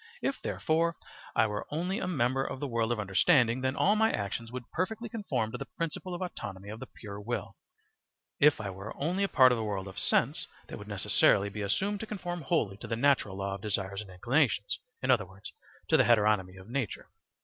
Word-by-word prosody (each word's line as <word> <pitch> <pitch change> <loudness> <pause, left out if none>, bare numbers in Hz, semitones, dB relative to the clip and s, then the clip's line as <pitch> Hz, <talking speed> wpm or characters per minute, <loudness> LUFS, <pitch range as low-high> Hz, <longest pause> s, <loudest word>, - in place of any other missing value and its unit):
If 275 - -1
therefore 165 +1 +1 0.4
I - - +5
were 105 -1 -3
only 180 +7 -1
a - - -2
member 135 -5 +1
of 135 - -4
the 145 - -2
world 115 -3 0
of 120 - 0
understanding, 115 - +3
then 130 +1 0
all 205 - +4
my 220 +1 +4
actions 110 +3 -3
would 125 -2 -6
perfectly 220 +6 -2
conform 135 - -2
to - - -5
the - - -5
principle 170 +2 -3
of 180 - -3
autonomy 100 - -6
of 110 +2 -7
the - - -7
pure 100 -2 -9
will; 120 +4 -4 0.8
if 150 +1 +6
I 100 -3 -3
were 95 +3 -8
only 180 +7 0
a - - +3
part 130 -3 +7
of 120 - +1
the - - -1
world 100 -2 -3
of 95 - -6
sense, - - +2 0.2
they - - -11
would - - -9
necessarily 100 0 +3
be 105 +1 -6
assumed 195 - 0
to 220 - -5
conform 175 -4 -4
wholly 135 - 0
to - - -8
the 115 - -1
natural 120 -6 +2
law 100 0 -2
of 100 - -6
desires 100 -1 -2
and 105 - -11
inclinations, 105 - +1 0.2
in 130 - +3
other 105 -7 +3
words, 95 +2 -11 0.4
to - - +6
the - - +6
heteronomy 105 -5 +3
of 95 - -13
nature. 125 -3 -3
120 Hz, 215 wpm, -30 LUFS, 100-160 Hz, 0.8 s, part